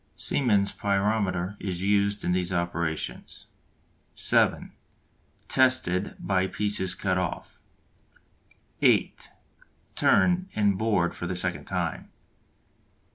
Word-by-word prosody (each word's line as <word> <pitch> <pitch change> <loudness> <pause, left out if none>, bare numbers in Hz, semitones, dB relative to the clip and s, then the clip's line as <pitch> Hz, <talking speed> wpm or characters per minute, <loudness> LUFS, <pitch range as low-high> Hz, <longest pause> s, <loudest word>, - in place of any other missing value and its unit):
Siemens' 105 -7 +1
pyrometer 100 -2 0
is 90 -2 -4
used 100 0 +1
in 90 - 0
these 90 0 0
operations. 85 -2 -3 0.7
(7) - - +1 0.8
Tested 125 -8 +2
by 95 -1 0
pieces 100 -2 -1
cut 95 -2 0
off. 90 -2 -5 1.2
(8) - - +2 0.6
Turned 180 +1 +3
and 105 -2 +2
bored 100 -4 +1
for 85 - -5
the 90 - -3
second 90 0 -3
time. - - -3
95 Hz, 95 wpm, -26 LUFS, 90-105 Hz, 1.2 s, Turned